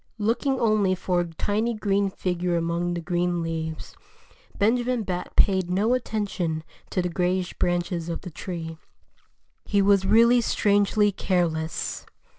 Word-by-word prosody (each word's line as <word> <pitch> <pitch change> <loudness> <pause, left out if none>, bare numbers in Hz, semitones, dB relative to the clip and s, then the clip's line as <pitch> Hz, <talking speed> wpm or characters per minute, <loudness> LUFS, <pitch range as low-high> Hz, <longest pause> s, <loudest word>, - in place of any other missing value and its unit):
Looking 235 +5 0
only 215 -4 +2
for 180 -1 0
a 175 - 0
tiny 210 +7 -1
green 200 -2 +1
figure 180 -2 -2
among 170 +1 -1
the 170 - -3
green 175 0 -1
leaves, 160 -1 -5 0.6
Benjamin 240 +2 +1
Bat 180 -2 -4
paid 190 -3 +3
no 205 +6 +2
attention 200 -9 -2 0.3
to 185 - -1
the - - 0
grayish 180 +1 -1
branches 175 -1 -1
of 165 - -4
the 180 - -8
tree. 165 -2 -6 0.8
He 205 - +1
was 195 -1 +4
really 235 +3 +5
strangely 205 -1 +2
careless. 165 -4 -1
185 Hz, 135 wpm, -25 LUFS, 175-210 Hz, 0.8 s, really